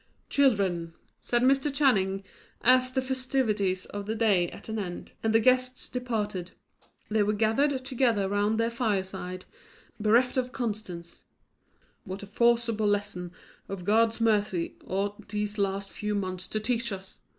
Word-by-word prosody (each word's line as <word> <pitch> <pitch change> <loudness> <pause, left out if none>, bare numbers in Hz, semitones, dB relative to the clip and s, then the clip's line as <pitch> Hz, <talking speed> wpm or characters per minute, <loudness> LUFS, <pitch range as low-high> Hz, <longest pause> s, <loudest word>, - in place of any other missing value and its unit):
"Children," 190 -11 +2 0.2
said 240 0 0
Mr. 270 +2 +3
Channing, 195 -9 +2 0.4
as, 255 +1 +5
the 260 0 0
festivities 245 -8 0
of 205 0 -6
the 220 - -1
day 200 -6 +3
at - - -11
an 220 0 -3
end, 180 -3 -6
and 225 - +1
the 225 - +5
guests 255 +2 +2
departed, 210 -7 -3 0.6
they 215 0 +3
were 210 +1 +2
gathered 255 +6 +1
together 235 -6 +2
round 205 +2 +1
their 230 +1 +1
fireside, 190 -5 -2 0.5
bereft 235 +5 +3
of 250 -1 0
Constance 210 -9 -5 0.8
"what 195 -1 -7
a - - -5
forcible 230 0 +2
lesson 205 -4 -1 0.4
of 190 -3 -5
God's 225 +3 +3
mercy 210 -6 +1
ought 200 +2 -3
these 210 0 -2
last 195 0 -1
few 210 -1 -3
months 185 -2 -3
to 215 - -2
teach 235 +1 -1
us! 190 -1 -8
215 Hz, 145 wpm, -28 LUFS, 195-240 Hz, 0.8 s, as